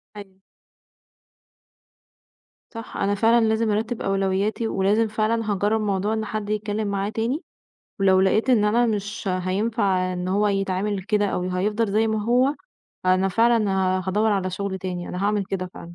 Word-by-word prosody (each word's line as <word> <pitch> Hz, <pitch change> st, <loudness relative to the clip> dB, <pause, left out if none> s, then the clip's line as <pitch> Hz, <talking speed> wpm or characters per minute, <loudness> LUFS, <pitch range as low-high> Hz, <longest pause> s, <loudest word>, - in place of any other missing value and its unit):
أيوه. 195 Hz, -2 st, -12 dB, 2.3 s
صح، 230 Hz, -1 st, -8 dB
أنا 200 Hz, +1 st, 0 dB
فعلًا 225 Hz, +2 st, +4 dB
لازم 220 Hz, 0 st, +1 dB
أرتِّب 220 Hz, +3 st, -2 dB
أولوياتي، 195 Hz, +3 st, 0 dB
ولازم 210 Hz, +4 st, +1 dB
فعلًا 215 Hz, +1 st, -1 dB
هاجرّب 205 Hz, +2 st, +1 dB
موضوع 200 Hz, +1 st, 0 dB
إن 220 Hz, 0 st, -2 dB
حد 215 Hz, -1 st, -4 dB
يتكلم 210 Hz, 0 st, -2 dB
معاه 200 Hz, 0 st, -1 dB
تاني، 230 Hz, -, -2 dB, 0.6 s
ولو 190 Hz, -1 st, +4 dB
لقيت 215 Hz, +6 st, +2 dB
إن 225 Hz, -5 st, +4 dB
أنا 235 Hz, +3 st, +3 dB
مش 210 Hz, -2 st, -3 dB
هينفع 185 Hz, 0 st, 0 dB
إن 180 Hz, 0 st, -4 dB
هو 205 Hz, +2 st, +2 dB
يتعامل 195 Hz, 0 st, -1 dB
كده 205 Hz, +1 st, +1 dB
أو 180 Hz, -2 st, -2 dB
هيفضل 210 Hz, +4 st, 0 dB
زي 220 Hz, +1 st, +2 dB
ما 220 Hz, -1 st, -1 dB
هو، 255 Hz, +5 st, +3 dB, 0.5 s
فأنا 185 Hz, +1 st, +3 dB
فعلًا 225 Hz, +1 st, +2 dB
ه 185 Hz, 0 st, +1 dB
هادوّر 210 Hz, +3 st, +2 dB
على 185 Hz, -2 st, -1 dB
شغل 190 Hz, +1 st, -4 dB
تاني، 180 Hz, -2 st, -5 dB
أنا 180 Hz, +2 st, -4 dB
هاعمل 205 Hz, -1 st, +1 dB
كده 185 Hz, -1 st, -4 dB
فعلًا، 170 Hz, 0 st, -10 dB
205 Hz, 160 wpm, -23 LUFS, 190-220 Hz, 2.3 s, فعلًا